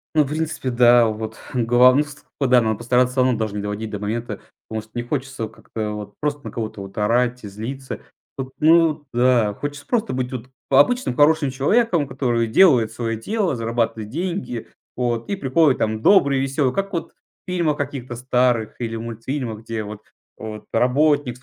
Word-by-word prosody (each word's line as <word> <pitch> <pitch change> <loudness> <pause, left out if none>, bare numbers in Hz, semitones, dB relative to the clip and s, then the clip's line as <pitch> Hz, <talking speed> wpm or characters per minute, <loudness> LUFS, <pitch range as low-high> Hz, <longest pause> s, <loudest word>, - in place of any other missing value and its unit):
Ну, 155 - +5
в - - -5
принципе, 155 -2 -2
да. 120 -1 +5
Вот, 110 0 -5 0.2
глав 125 +1 +5
ну 145 - +4
ст 145 -1 -13
вот 135 -3 +1
да. 125 -1 +7
Надо 110 -2 0
постараться 125 +2 +2
всё 130 - +3
равно 125 -3 +2
даже 110 -2 -3
не 105 - -2
доводить 105 +2 -4
до 105 -1 -5
момента. 115 +3 -4 0.3
Потому 110 -1 -4
что 110 - -21
не 120 - -3
хочется 135 -2 -3
как-то 110 0 -6
вот 105 -1 -8
просто 145 -1 -2
на - - -5
кого-то 110 -4 -5
вот 95 0 -10
орать 120 +3 +1
и - - -6
злиться. 125 +7 -6 0.4
Вот, 130 -1 -4
ну 160 -1 +4
да, 120 -3 +3
хочется 145 +2 -6
просто 230 -2 0
быть 125 0 -2
вот 125 -1 -6 0.2
па 135 - +5
обычным 245 - +2
хорошим 145 0 +4
человеком, 170 - +2
который 120 -4 0
делает 120 - +5
свое 115 0 -3
дело, 195 - -1
зарабатывает 115 -2 -2
деньги. 170 - -4 0.3
Вот, 120 -2 -2
и 200 - 0
приходит 145 -3 +2
там 110 0 -1
добрый, 140 - +5
веселый, 135 -1 0
как 195 0 -2
вот 165 -1 -3
в - - -14
фильмах 165 -5 +1
каких-то 135 -4 -4
старых 125 -2 +1
или 115 -2 -3
мультфильмах, 115 +1 -4
где 115 -1 -4
вот 105 0 -8 0.4
вот 110 -1 -8
работник 130 +1 +2
с - - -22
125 Hz, 190 wpm, -21 LUFS, 115-145 Hz, 0.4 s, да